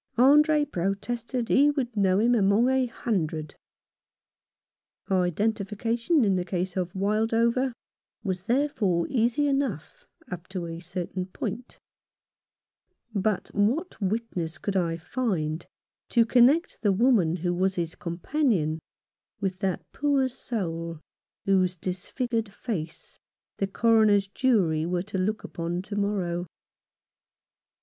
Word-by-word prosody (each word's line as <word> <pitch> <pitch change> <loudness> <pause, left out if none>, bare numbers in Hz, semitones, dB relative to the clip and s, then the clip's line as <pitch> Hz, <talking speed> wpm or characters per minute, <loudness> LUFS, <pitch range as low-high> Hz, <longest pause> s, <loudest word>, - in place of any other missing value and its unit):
Andre 295 +4 +5
protested 230 +5 -2
he 285 +2 +5
would 260 -5 -2
know 190 -2 +3
him 235 +4 +3
among 215 +2 +4
a 265 -1 +2
hundred. 160 -10 -2 1.6
Identification 220 - +1
in 195 -2 +2
the 180 - 0
case 180 0 -3
of 180 -2 -1
Wildover 225 +6 +1 0.5
was 185 -3 -3
therefore 230 - +1
easy 240 +3 +2
enough 275 - -2 0.2
up 180 -1 -7
to 185 -3 -4
a 165 0 -6
certain 180 +1 -4
point; 230 +5 -6 1.4
but 205 -1 0
what 235 - 0
witness 190 -5 -2
could 200 - -3
I 170 -3 +1
find 170 -6 -2 0.4
to 235 -2 +4
connect 255 +8 +4
the 205 - +3
woman 195 -6 +3
who 175 0 -1
was 190 +2 +1
his 170 -1 -2
companion 175 - 0 0.6
with 190 -2 -2
that 190 -2 -1
poor 280 -2 +2
soul 170 - -4 0.5
whose 185 -2 +2
disfigured 220 +6 -3
face 175 -7 -6 0.4
the 195 - 0
Coroner's 215 -1 +4
jury 195 -9 +2
are 175 +1 -1
to 200 -1 -4
look 210 +4 -1
upon 170 +2 -4
to 205 - -6
morrow 185 -4 -1
200 Hz, 115 wpm, -27 LUFS, 180-235 Hz, 1.6 s, Andre